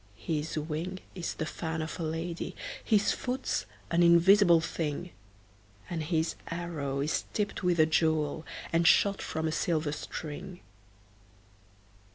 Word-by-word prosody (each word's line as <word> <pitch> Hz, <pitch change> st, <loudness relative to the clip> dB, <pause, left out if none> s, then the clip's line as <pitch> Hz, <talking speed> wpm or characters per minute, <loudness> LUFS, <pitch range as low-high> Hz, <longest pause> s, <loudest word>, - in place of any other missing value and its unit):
His 155 Hz, +5 st, -2 dB
wing 160 Hz, +4 st, -3 dB, 0.2 s
is 175 Hz, -3 st, -4 dB
the 160 Hz, -, -2 dB
fan 160 Hz, 0 st, -4 dB
of 160 Hz, -, -6 dB
a -, -, -2 dB
lady, 165 Hz, +2 st, -3 dB, 0.3 s
His 205 Hz, -2 st, +3 dB
foot's 255 Hz, +1 st, -2 dB, 0.2 s
an 170 Hz, +1 st, +3 dB
invisible 170 Hz, +1 st, +7 dB
thing, 165 Hz, +1 st, -3 dB, 0.8 s
And 165 Hz, -2 st, -2 dB
his 160 Hz, +1 st, 0 dB
arrow 160 Hz, -5 st, -3 dB
is 150 Hz, +3 st, 0 dB
tipped 205 Hz, -2 st, -1 dB
with 180 Hz, -2 st, +2 dB
a 155 Hz, -, +7 dB
jewel, 155 Hz, -1 st, +1 dB, 0.3 s
And 165 Hz, 0 st, +4 dB
shot 200 Hz, +2 st, +5 dB
from 160 Hz, 0 st, -2 dB
a -, -, 0 dB
silver 155 Hz, -1 st, 0 dB
string. 170 Hz, +4 st, -6 dB
165 Hz, 135 wpm, -30 LUFS, 155-175 Hz, 0.8 s, invisible